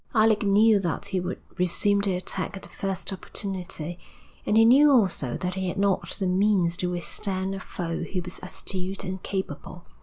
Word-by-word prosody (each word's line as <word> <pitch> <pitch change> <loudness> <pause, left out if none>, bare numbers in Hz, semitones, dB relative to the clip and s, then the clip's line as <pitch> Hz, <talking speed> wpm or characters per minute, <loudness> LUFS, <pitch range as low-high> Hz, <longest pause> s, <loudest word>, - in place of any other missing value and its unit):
Alec 215 -1 +4
knew 210 +1 +5
that 175 -5 -2
he 190 -2 0
would 180 +1 -4 0.2
resume 200 +3 +2
the 200 -2 +1
attack 185 +2 -3
at - - -11
the - - -10
first 195 0 -4
opportunity, 180 -3 -3 0.5
and 210 - +3
he 225 - +7
knew 275 +6 +7
also 185 - +2
that 180 0 -3
he 190 0 -2
had 180 - -3
not 195 -1 +1
the 195 - -1
means 185 -2 +2
to 180 - -1
withstand 190 +2 -1
a 195 - -4
foe 170 -3 -4
who 185 - -3
was 180 +1 -7
astute 185 +1 -4
and 185 0 -5
capable. 190 -2 -5
190 Hz, 185 wpm, -26 LUFS, 180-200 Hz, 0.5 s, he